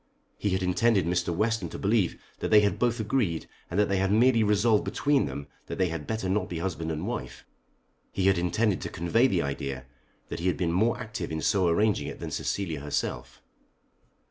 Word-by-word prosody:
He 105 - 0
had 95 0 0
intended 95 +1 +2
Mr. 85 0 0
Western 115 +6 0
to - - -7
believe 100 -3 +1 0.2
that - - -2
they 105 -1 +7
had 100 -1 0
both 120 0 +1
agreed, 105 -7 0 0.2
and 90 - -1
that 105 - +4
they 100 - +1
had 95 +1 +1
merely 115 +1 +4
resolved 105 +1 +3
between 145 -1 +1
them 70 - -6 0.2
that - - -5
they 95 -2 +2
had 80 -3 -5
better 110 -4 -2
not 95 0 0
be 85 - -4
husband 85 -2 -3
and 75 - -3
wife. - - -5 0.7
He 95 - -1
had 95 -2 +4
intended 95 +3 +1
to - - -4
convey 115 +10 +2
the 90 - +1
idea 70 -2 -4 0.4
that - - -4
he 85 - -1
had 90 - +1
been 85 -3 0
more 110 +7 +2
active 110 -5 -5
in 80 - -2
so 95 +4 +2
arranging 105 +5 +2
it - - -7
than - - -5
Cecilia 85 -7 -2
herself. 70 -4 -4
95 Hz, 205 wpm, -27 LUFS, 85-110 Hz, 0.7 s, they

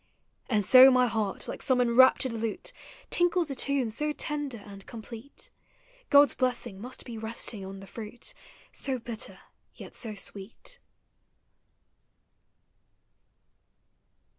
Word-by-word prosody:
And 210 -5 +1
so 260 +4 +10
my 255 -1 +4
heart, 220 -4 -2
like - - -6
some 260 -1 +2
enraptured 250 +1 +5
lute, 225 -1 -3 0.4
Tinkles 350 -3 +2
a - - -3
tune 265 -3 0
so 300 +7 -1
tender 295 -5 -2
and 200 -1 -11
complete, 235 - -10 0.6
God's 285 0 +7
blessing 245 -6 -2
must 250 +3 -6
be 230 -3 -7
resting 220 -2 -2
on 195 0 -8
the - - -10
fruit 220 +4 -8 0.4
So 265 -2 -2
bitter, 235 -1 -5 0.4
yet - - -11
so 220 -3 -4
sweet 205 - -6
240 Hz, 115 wpm, -28 LUFS, 215-270 Hz, 0.6 s, so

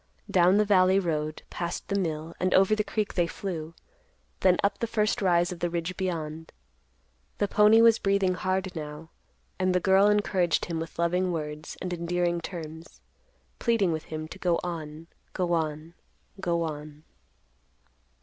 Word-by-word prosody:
Down 180 +2 +5
the 210 - +4
valley 190 -2 +4
road, 155 -4 -2
past 170 0 -4
the 200 - -1
mill, 160 -2 -3
and 185 +1 +2
over 195 +3 +5
the 210 - 0
creek 215 0 -2
they 175 -2 +1
flew; 165 -3 -5 0.6
then 180 -1 +4
up 200 0 +1
the 230 - -1
first 215 -2 0
rise 175 -2 +3
of 175 - -7
the 175 - 0
ridge 170 +1 -3
beyond. 160 -4 -4 0.9
The 205 - +1
pony 215 +3 +6
was 230 -1 +6
breathing 195 -2 +2
hard 185 0 -2
now, 150 +1 -7 0.5
and 185 0 +1
the - - +4
girl 190 +2 +4
encouraged 195 -4 +2
him 165 -2 -3
with 165 0 -7
loving 180 +2 +1
words 150 -2 -5
and 180 -1 -3
endearing 175 0 -1
terms; 165 -1 -8 0.6
pleading 225 -7 +2
with 155 -1 -3
him 155 0 -6
to 190 - -10
go 175 -3 +1
on, 160 -2 -6 0.3
go 175 -2 0
on, 160 0 -2 0.5
go 170 -2 0
on. 150 -1 -7
175 Hz, 160 wpm, -27 LUFS, 160-190 Hz, 0.9 s, pony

